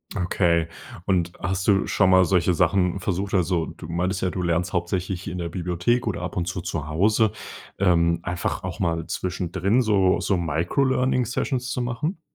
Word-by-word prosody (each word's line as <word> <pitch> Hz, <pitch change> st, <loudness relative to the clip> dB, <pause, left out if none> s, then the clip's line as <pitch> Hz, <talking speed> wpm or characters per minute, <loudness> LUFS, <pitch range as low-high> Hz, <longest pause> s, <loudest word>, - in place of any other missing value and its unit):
Okay 85 Hz, -3 st, +1 dB, 0.4 s
und 90 Hz, -3 st, +1 dB
hast 95 Hz, +3 st, -2 dB
du 100 Hz, -2 st, +4 dB
schon 95 Hz, -, +2 dB
mal 95 Hz, 0 st, +6 dB
solche 90 Hz, -1 st, +2 dB
Sachen 90 Hz, +2 st, +2 dB
versucht 95 Hz, +2 st, -2 dB
also, 90 Hz, -3 st, +1 dB
du 80 Hz, -, -10 dB
meintest 90 Hz, +3 st, -1 dB
ja 95 Hz, -, +1 dB
du 90 Hz, -, -4 dB
lernst 85 Hz, +1 st, 0 dB
hauptsächlich 90 Hz, +2 st, -2 dB
in 90 Hz, -1 st, -4 dB
der 85 Hz, -1 st, -3 dB
Bibliothek 90 Hz, +8 st, 0 dB
oder 90 Hz, -5 st, -2 dB
ab 90 Hz, -, -5 dB
und 85 Hz, -, -1 dB
zu 90 Hz, -1 st, -3 dB
zu 85 Hz, -4 st, -4 dB
Hause, 105 Hz, +7 st, +2 dB, 0.4 s
ähm, 85 Hz, -3 st, +3 dB
einfach 90 Hz, 0 st, -3 dB
auch -, -, -5 dB
mal 85 Hz, -2 st, 0 dB
zwischendrin 95 Hz, +5 st, 0 dB
so 100 Hz, -5 st, +3 dB
so 100 Hz, -, +1 dB
Microlearning 125 Hz, -, +1 dB
Sessions 125 Hz, +1 st, -2 dB
zu 125 Hz, -, -2 dB
machen? 150 Hz, +9 st, -3 dB
90 Hz, 175 wpm, -24 LUFS, 85-100 Hz, 0.4 s, mal